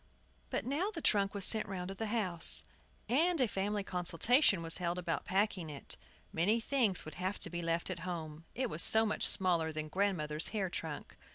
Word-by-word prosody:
But - - -3
now 300 - -1
the 420 - -7
trunk 200 -7 +1
was 200 -2 +3
sent 220 -1 +5
round 185 -2 -5
to - - -5
the 220 +3 -4
house, 190 -7 +4 0.4
and 320 +8 +2
a 255 - +3
family 205 0 -2
consultation 185 - +2
was 165 0 -1
held 175 -1 -2
about 175 -2 -3
packing 190 -3 -1
it. 145 -2 -4 0.4
Many 200 +8 +1
things 230 -6 +1
would 155 - -8
have 190 +2 -2
to 170 - -1
be 175 0 -4
left 165 0 -2
at 175 - -5
home, 165 -3 -7
it 255 +1 -1
was 165 -6 0
so 220 +5 +5
much 215 - +1
smaller 170 -4 +2
than 155 0 -4
the - - -12
grandmother's 165 -6 0
hair 195 -5 -3
trunk. 160 -4 -7
185 Hz, 200 wpm, -33 LUFS, 165-220 Hz, 0.4 s, sent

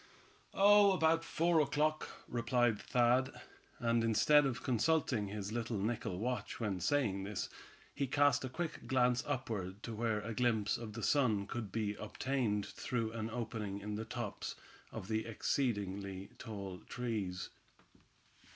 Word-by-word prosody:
"Oh! 205 0 +7
about 165 -2 +3
four 165 0 +2
o'clock," 150 +1 +1 0.2
replied 120 -2 +1
Thad, 125 +2 +3 0.5
and 115 -1 +2
instead 135 +6 +5
of 115 -4 -4
consulting 125 -3 +1
his 100 0 -5
little 115 -1 -2
nickel 105 -3 -2
watch 125 +5 -3
when 105 -5 -1
saying 100 -2 +1
this, 100 0 -3 0.4
he 140 -1 -1
cast 145 +2 +3
a 130 - -3
quick 165 +5 -4
glance 125 -2 +3
upward 105 -6 -3
to 115 - -5
where 110 -1 0
a 115 +2 -4
glimpse 110 -3 +1
of 110 -3 -6
the - - -6
sun 115 -9 +3
could 110 -1 -5
be 105 -1 -1
obtained 105 -1 -1
through 115 -3 -3
an 110 -1 -3
opening 110 -4 -4
in 105 +1 -5
the 105 +2 -3
tops 120 -3 -4 0.4
of 95 - -6
the 110 0 0
exceedingly 100 -5 -2
tall 100 -4 -6
trees. 105 -7 -3
115 Hz, 140 wpm, -35 LUFS, 105-130 Hz, 0.5 s, Oh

